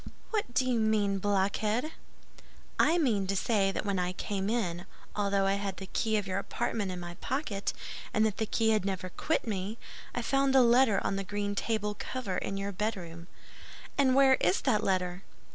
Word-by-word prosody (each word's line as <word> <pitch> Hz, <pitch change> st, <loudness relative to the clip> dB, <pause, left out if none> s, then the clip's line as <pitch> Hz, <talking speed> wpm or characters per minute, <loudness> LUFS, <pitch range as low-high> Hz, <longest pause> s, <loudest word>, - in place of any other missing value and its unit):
"What 405 Hz, -, -2 dB
do 260 Hz, -, +3 dB
you 250 Hz, -2 st, +1 dB
mean, 210 Hz, -3 st, +2 dB
blockhead?" 205 Hz, +7 st, 0 dB, 0.9 s
"I 325 Hz, +4 st, +5 dB
mean 220 Hz, -, +1 dB
to 195 Hz, -, 0 dB
say 195 Hz, -1 st, +2 dB
that 195 Hz, -, -3 dB
when 200 Hz, -2 st, 0 dB
I 180 Hz, 0 st, -1 dB
came 195 Hz, +1 st, -2 dB
in, 190 Hz, -6 st, -1 dB, 0.3 s
although 200 Hz, -1 st, +1 dB
I 195 Hz, -, +3 dB
had 195 Hz, -2 st, -3 dB
the 190 Hz, -, -6 dB
key 220 Hz, +3 st, 0 dB
of 205 Hz, -, -1 dB
your 190 Hz, 0 st, -1 dB
apartment 200 Hz, 0 st, -2 dB
in 180 Hz, -, -5 dB
my 175 Hz, 0 st, -6 dB
pocket, 255 Hz, -7 st, -2 dB, 0.4 s
and 215 Hz, -1 st, +3 dB
that 220 Hz, 0 st, -1 dB
key 225 Hz, -1 st, +2 dB
had 215 Hz, -3 st, +2 dB
never 190 Hz, -1 st, -3 dB
quit 315 Hz, -, -1 dB
me, 205 Hz, 0 st, -3 dB, 0.4 s
I 245 Hz, -, -2 dB
found 275 Hz, +1 st, +2 dB
a 265 Hz, -, +8 dB
letter 235 Hz, -4 st, +5 dB
on 195 Hz, -, 0 dB
the 195 Hz, -, -2 dB
green 205 Hz, +1 st, -2 dB
table 210 Hz, 0 st, -1 dB
cover 220 Hz, -8 st, -3 dB
in 195 Hz, -, -3 dB
your 200 Hz, +1 st, -3 dB
bedroom." 180 Hz, -5 st, -4 dB, 0.7 s
"And 265 Hz, -2 st, +3 dB
where 270 Hz, -1 st, +6 dB
is 180 Hz, +2 st, +2 dB
that 210 Hz, 0 st, +2 dB
letter?" 180 Hz, -1 st, 0 dB
205 Hz, 190 wpm, -30 LUFS, 195-230 Hz, 0.9 s, a